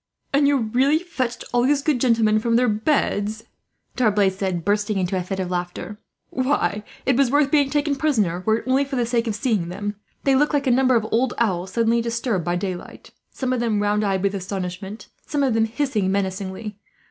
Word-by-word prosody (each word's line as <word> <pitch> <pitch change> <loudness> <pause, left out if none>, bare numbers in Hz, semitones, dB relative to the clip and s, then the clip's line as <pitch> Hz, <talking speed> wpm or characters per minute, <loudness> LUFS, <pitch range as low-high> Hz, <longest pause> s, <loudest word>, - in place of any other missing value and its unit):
"And 280 0 +4
you 285 0 +3
really 255 +6 +2
fetched 260 -9 -3
all 245 - +3
these 275 +2 +2
good 285 -6 +1
gentlemen 225 -4 +3
from 230 +1 0
their 250 +1 +3
beds," 215 -2 0 0.5
D'Arblay 210 -5 +3
said, 185 -3 -3
bursting 205 +1 +1
into 185 0 -1
a 185 - 0
fit 190 +2 -4
of 185 -1 -3
laughter. 180 +3 -4 0.3
"Why, 255 -5 0 0.2
it 265 - +3
was 270 -1 +3
worth 285 +1 +2
being 285 -3 +3
taken 295 0 +1
prisoner, 215 - 0
were 220 0 +4
it - - -7
only 265 +2 +3
for 275 0 -5
the 245 -2 +1
sake 235 0 0
of 215 - -1
seeing 205 -6 0
them. 205 +3 -4 0.3
They 275 -1 +3
looked 295 +2 +2
like 285 0 0
a 260 - +3
number 255 0 +4
of 225 -2 +2
old 245 +2 +1
owls, 185 -5 -1
suddenly 230 0 +2
disturbed 230 -4 -1
by 175 +1 -1
daylight 185 -1 -6 0.2
some 255 -1 -2
of 255 - 0
them 225 -3 0
round 205 +1 +1
eyed 195 -2 0
with 200 0 +1
astonishment, 190 +2 -5 0.2
some 290 -2 0
of 260 -4 +2
them 225 0 +3
hissing 225 -5 -1
menacingly. 195 +1 -3
225 Hz, 205 wpm, -22 LUFS, 195-260 Hz, 0.5 s, And